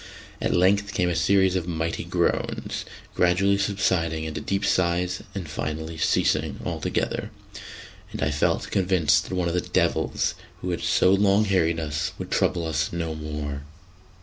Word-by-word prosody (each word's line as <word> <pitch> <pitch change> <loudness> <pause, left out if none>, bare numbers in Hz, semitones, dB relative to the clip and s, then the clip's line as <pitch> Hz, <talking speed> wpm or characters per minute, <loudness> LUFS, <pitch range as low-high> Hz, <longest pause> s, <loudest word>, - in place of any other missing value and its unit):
At - - 0
length 100 +3 +2
came 90 -1 +2
a 85 - -1
series 95 0 +3
of 90 -2 -1
mighty 80 -1 -2
groans, - - -1 0.3
gradually 95 +3 +3
subsiding 90 -5 0
into 80 -1 -4
deep 100 0 -1
sighs, 90 -1 +1
and 95 -4 -4
finally 80 +2 -4
ceasing - - +1
altogether; - - -2 0.8
and - - -3
I 75 - +1
felt 75 - 0
convinced 85 -5 +2
that 95 - -3
one 90 -1 0
of 85 - -1
the 90 - +1
"devils" - - 0 0.3
who 90 - -2
had 85 - -2
so 95 - +3
long 100 +1 +4
harried 85 -4 +2
us 75 -1 -2
would - - -7
trouble 85 -2 +1
us 80 -3 -1
no 85 -2 -3
more. 75 -2 -5
85 Hz, 155 wpm, -25 LUFS, 80-95 Hz, 0.8 s, long